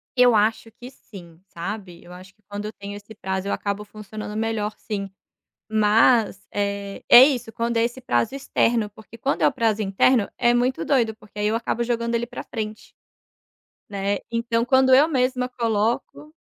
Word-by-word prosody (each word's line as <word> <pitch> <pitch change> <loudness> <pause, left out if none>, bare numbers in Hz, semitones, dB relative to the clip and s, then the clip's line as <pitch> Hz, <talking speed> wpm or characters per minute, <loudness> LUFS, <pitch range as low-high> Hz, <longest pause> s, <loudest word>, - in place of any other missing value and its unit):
Eu 245 -2 +5
acho 220 +1 +1
que 245 +2 -11
sim, 175 -10 -14
sabe, 180 0 -7
eu 175 - -14
acho 185 +1 -12
que 210 - -37
quando 205 +1 -5
eu 215 - -6
tenho 200 0 -8
esse 205 +2 -11
prazo 190 -1 -3
eu - - 0
acabo 200 0 -3
funcionando 210 0 -8
melhor 220 -1 -2
sim, 200 -2 -5 0.6
mas, 215 -1 +3
eh, 200 -1 -3
é 240 - +11
isso, 250 -5 +1
quando 235 0 -1
é 230 - +3
esse 240 +2 -3
prazo 120 - 0
externo, 230 -5 0
porque 220 +2 -15
quando 275 +5 -1
é - - +5
o - - +2
prazo 225 -5 0
interno 200 +3 +2
é 240 0 +3
muito 250 +2 0
doido, 235 -6 +1
porque 210 -2 -13
aí 210 - +1
eu 215 - +1
acabo 235 0 -1
jogando 235 0 -1
ele 235 +1 -1
pra 245 - -7
frente, 215 -2 -7 1.0
né, 200 0 -2
então 230 0 0
quando 260 0 +4
eu 285 +4 +6
mesma 255 -3 0
coloco 235 +5 -2
220 Hz, 180 wpm, -23 LUFS, 205-240 Hz, 1.0 s, é